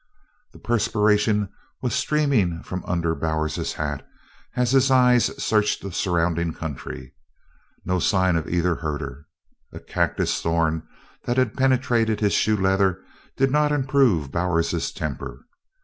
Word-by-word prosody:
The - - -15
perspiration 105 -2 +1 0.3
was 125 -4 -1
streaming 125 - +1
from 90 -1 -5
under 85 -2 0
Bowers's 80 -2 -2
hat 70 -2 -3 0.5
as 125 -1 +1
his 135 0 +4
eyes 125 -2 +5
searched 105 -1 +1
the 100 - -5
surrounding 85 -2 0
country. 70 -5 -7 0.7
Not 90 +1 0
a - - -2
sign 95 -1 +2
of 80 -1 -2
either 90 0 +1
herder! 75 -2 -5 0.4
A - - -9
cactus - - -1
thorn 80 -1 0 0.4
that 120 +1 -1
had 130 -4 +2
penetrated 125 -4 +1
his 105 -2 +1
shoe 110 -1 +2
leather 95 -1 +1 0.3
did 135 0 +2
not 150 +1 +2
improve 130 - +2
Bowers's 85 0 0
temper. - - -6
95 Hz, 135 wpm, -23 LUFS, 85-120 Hz, 0.7 s, eyes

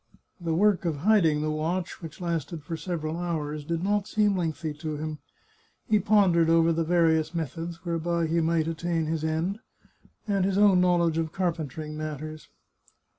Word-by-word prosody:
The 165 -2 -1
work 205 +1 +3
of 165 -3 0
hiding 165 -3 +3
the 155 - 0
watch, 170 +5 -2
which 165 -2 -9
lasted 165 -3 -3
for 165 +3 -4
several 160 -2 -3
hours, 155 -4 -3
did 165 +3 -2
not 205 +1 +1
seem 210 -2 +2
lengthy 165 -3 -2
to 155 -2 -4
him. 155 0 -5 0.7
He 215 -1 +4
pondered 185 -5 +4
over 165 0 +4
the 165 +1 0
various 160 -1 +2
methods 165 +3 -5
whereby 170 0 0
he 165 +1 +1
might 160 0 +1
attain 165 0 -1
his 160 0 -2
end, 160 +6 -1 0.7
and 200 -2 +1
his 195 0 +1
own 200 -3 +5
knowledge 170 -2 +2
of 160 -1 -2
carpentering 155 -4 -3
matters. 155 0 -6
165 Hz, 165 wpm, -27 LUFS, 155-180 Hz, 0.7 s, own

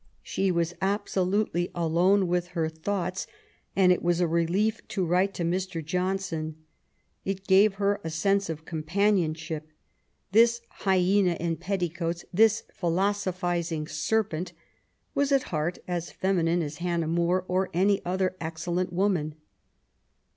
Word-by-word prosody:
She 195 0 0
was 170 -1 0
absolutely 190 -2 0
alone 175 +4 +3
with 175 0 0
her 160 -1 +2
thoughts, 180 +3 -3 0.5
and 185 -2 +5
it 180 - +2
was 175 0 +1
a 180 - +3
relief 170 +7 +1
to 190 -3 -1
write 185 +3 +2
to 175 - -2
Mr. 175 -1 -2
John 180 +4 0
son. 160 -5 -4 0.7
It 195 0 -3
gave 195 +1 +5
her 200 0 0
a 160 - -3
sense 195 +4 +1
of 160 -1 -5
companionship. 160 -2 0 0.6
This 235 +3 +5
hyena 190 -1 +2
in 170 0 -2
petticoats,'^ 175 -1 -2
this 220 +3 +4
''philosophizing 175 -3 -1
serpent,'* 190 -3 -1 0.6
was 285 0 +1
at 275 -2 +4
heart 155 +3 -1
as 175 -1 -2
feminine 175 -3 +1
as 150 0 -5
Hannah 170 -2 -1
More 175 +2 +1
or 185 +1 0
any 195 +3 +2
other 185 +1 0
*' - - -20
excellent 170 +2 -2
woman. 175 -5 0
180 Hz, 135 wpm, -27 LUFS, 170-195 Hz, 0.7 s, and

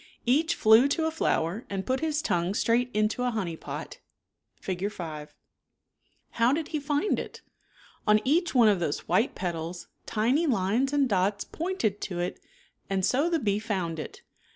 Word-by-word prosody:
Each 300 +7 +2
flew 220 +5 +6
to 320 +3 0
a 320 - 0
flower 205 - 0
and 195 -1 -3
piit 260 +1 0
his 310 -1 -1
tongue 180 - 0
straight 240 +3 +2
into 215 +2 0
a 250 - +1
honey 195 -8 -3
pot - - -7 0.6
{Fig. 190 +2 -3
5). 155 -6 -7 1.0
How 235 +2 +3
did 305 +2 -1
he 305 - -2
find 290 +7 0
it? - - -8 0.7
On 210 0 +6
each 325 +4 +1
one 235 -3 +6
of 205 -3 +3
those 155 -4 -2
white 230 - +2
petals, 175 -1 -4 0.2
tiny 250 +10 +1
lines 230 +3 +1
and 285 -2 +2
dots 200 -1 +1
pointed 310 - -2
to 180 - -4
it 175 +1 -3 0.5
and 190 -1 +1
so 285 +7 +2
the 340 - +2
bee 205 -7 0
found 185 -7 -3
it. - - -8
220 Hz, 170 wpm, -27 LUFS, 190-280 Hz, 1.0 s, flew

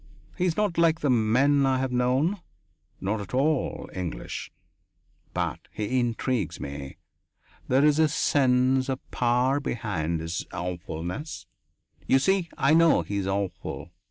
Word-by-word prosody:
He 180 - 0
is 170 -3 0
not 205 -5 +1
like 165 -1 +3
the 145 - +2
men 130 +5 +3
I 135 -1 +3
have 130 0 -1
known 130 +10 +1 0.6
not 105 +3 -1
at 100 +5 -6
all 145 +1 0
English. 85 -10 -5 0.8
But - - -2
he 110 +5 -1
intrigues 120 0 -1
me; 70 -1 -7 0.7
there 135 +3 +4
is 150 0 +4
a 160 - +5
sense 130 -3 +2
of 130 -1 -1
power 125 +3 +2
behind 100 - -2
his 80 +1 -3
awfulness 90 - -5 0.6
you 135 - +5
see 180 +5 +1
I 140 - +3
know 165 0 +5
that - - -19
he 100 - -1
is 95 -1 -2
awful! 95 -3 -3
125 Hz, 145 wpm, -26 LUFS, 100-145 Hz, 0.8 s, a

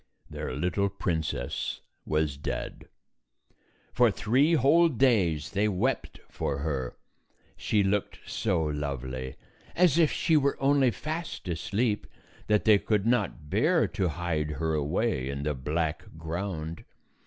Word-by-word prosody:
Their - - -4
little 90 +6 0
princess 85 -5 -2 0.3
was 75 -2 +1
dead. 70 -3 -5 1.1
For 120 -1 +5
three 130 +11 +2
whole 165 +5 +5
days 105 - +2
they 105 +2 +1
wept 110 +7 -1
for 70 - -3
her. 70 -4 -3 0.6
She 105 -2 +1
looked 100 +1 0
so 90 -7 0
lovely, 65 -3 -4 0.4
as 170 -3 +4
if 160 -3 +4
she 165 - +2
were 140 -2 +2
only 135 -1 +4
fast 155 - -5
asleep, 105 +6 -1 0.4
that 105 -1 +2
they 105 -2 +6
could 105 -1 0
not 115 -10 0
bear - - +3
to 95 - -1
hide 80 -2 -2
her 80 +2 -1
away 75 - 0
in 70 +1 -4
the 75 0 0
black 75 +4 -2
ground. 80 0 -4
90 Hz, 130 wpm, -28 LUFS, 75-120 Hz, 1.1 s, they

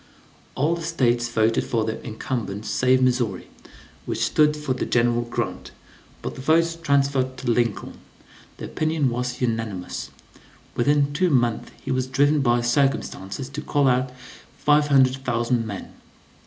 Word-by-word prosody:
All 150 +5 +1
the 170 - -4
States 120 -8 +1
voted 115 -1 +2
for 115 -2 -1
the 110 0 -4
incumbent 110 -2 -4
save 130 0 +2
Missouri, 120 -7 0 0.6
which - - 0
stood 150 0 +3
for 150 -3 -2
General 120 -1 +1
Grant, 120 0 -4 0.5
but - - -4
the - - -9
votes 165 +4 +2
transferred 140 -4 +1
to 125 -2 -1
Lincoln, 115 -3 -1 0.6
the - - -6
opinion 155 -4 0
was 125 +1 -3
unanimous. 110 -6 -3 0.6
Within 145 +3 +2
two 180 +4 +2
months 120 -6 +1
he 135 - -3
was 130 0 0
driven 145 +3 +2
by 120 -2 +2
circumstances 120 -3 -1
to 140 +2 -6
call 145 -2 +1
out 130 0 +2 0.5
five 150 0 +3
hundred 135 -2 +4
thousand 120 -2 0
men. 100 -2 -7
130 Hz, 140 wpm, -23 LUFS, 120-145 Hz, 0.6 s, hundred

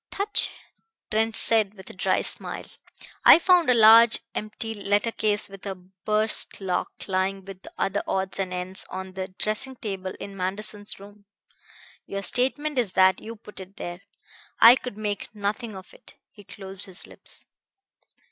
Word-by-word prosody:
"Touché!" 405 +1 0 0.6
Trent 220 +1 0
said, 215 -3 +3
with 190 -2 -14
a - - -15
dry 185 0 0
smile. - - +2 0.6
"I - - +10
found 350 -3 +4
a 250 - +5
large 230 +1 +8 0.2
empty 215 +1 -5
letter 205 +2 0
case 210 -2 0
with 195 -1 -13
a 195 - -4
burst 195 +4 -1
lock 185 -2 -2 0.2
lying 190 0 -1
with 195 -1 -11
other 200 +1 -1
odds 190 +1 -2
and 190 -1 -2
ends 180 +1 -2
on 190 0 -7
the 190 0 -5
dressing 215 +7 -2
table 190 -5 -5
in 200 - -8
Manderson's 205 +2 -3
room. 200 +1 -15 0.8
Your 200 0 -5
statement 270 +6 0
is 210 -7 -1
that 185 0 +4
you 225 +1 -8
put 210 -2 -14
it 190 +2 -12
there. 175 -1 -7 0.6
I 230 +2 +10
could 250 -5 -7
make 205 -2 -4
nothing 210 +2 -3
of 190 -1 -12
it." - - -16 0.2
He 205 - -17
closed 195 0 -1
his 185 -1 -1
lips. - - -9
205 Hz, 160 wpm, -25 LUFS, 190-220 Hz, 0.8 s, I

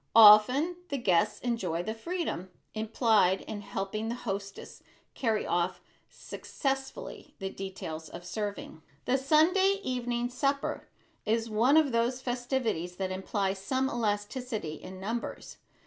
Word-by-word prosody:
Often 230 +10 +8
the 280 - -1
guests 185 -9 +2
enjoy 185 -9 -1
the 220 - -3
freedom 225 - -3 0.2
implied 215 -3 +3
in 210 -2 -6
helping 200 +2 -3
the 235 - -2
hostess 200 -4 -6 0.3
carry 225 -4 0
off 175 +1 0 0.3
successfully 270 - -5
the 195 -2 -4
details 165 -5 -6
of 175 0 -9
serving. 205 -4 -5 0.2
The 260 +2 +2
Sunday 360 +8 +4
evening 245 -2 -1
supper 275 +2 -1 0.4
is 225 +1 0
one 240 +8 +4
of 305 -4 +4
those 235 +2 +1
festivities 245 -8 -2
that 185 0 -2
imply 190 +1 -1
some 260 +8 -1
elasticity 215 - -2
in 185 +3 -9
numbers. 225 +5 -5
225 Hz, 125 wpm, -30 LUFS, 195-255 Hz, 0.4 s, Often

